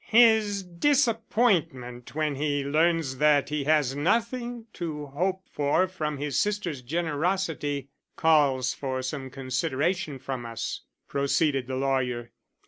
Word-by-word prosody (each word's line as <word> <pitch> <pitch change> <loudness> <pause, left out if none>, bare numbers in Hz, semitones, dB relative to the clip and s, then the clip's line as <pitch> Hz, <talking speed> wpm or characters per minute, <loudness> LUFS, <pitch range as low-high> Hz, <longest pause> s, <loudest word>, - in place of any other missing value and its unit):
"His 220 -3 +5
disappointment 190 - +1
when 155 -1 0
he 145 0 -1
learns 155 -2 +1
that 145 -1 +4
he 150 -2 -2
has 150 -3 +2
nothing 235 - -1
to 155 -4 -4
hope 185 +7 -2
for 145 +6 +1
from 155 -5 -3
his 140 -1 -1
sister's 200 -9 -1
generosity 155 -1 -1 0.3
calls 140 -5 +3
for 130 -1 -3
some 130 0 -4
consideration 140 +4 -1
from 130 -1 -5
us," 115 -1 -4 0.3
proceeded 140 -1 +1
the 130 - -3
lawyer. 130 -3 -1
150 Hz, 120 wpm, -27 LUFS, 135-180 Hz, 0.3 s, His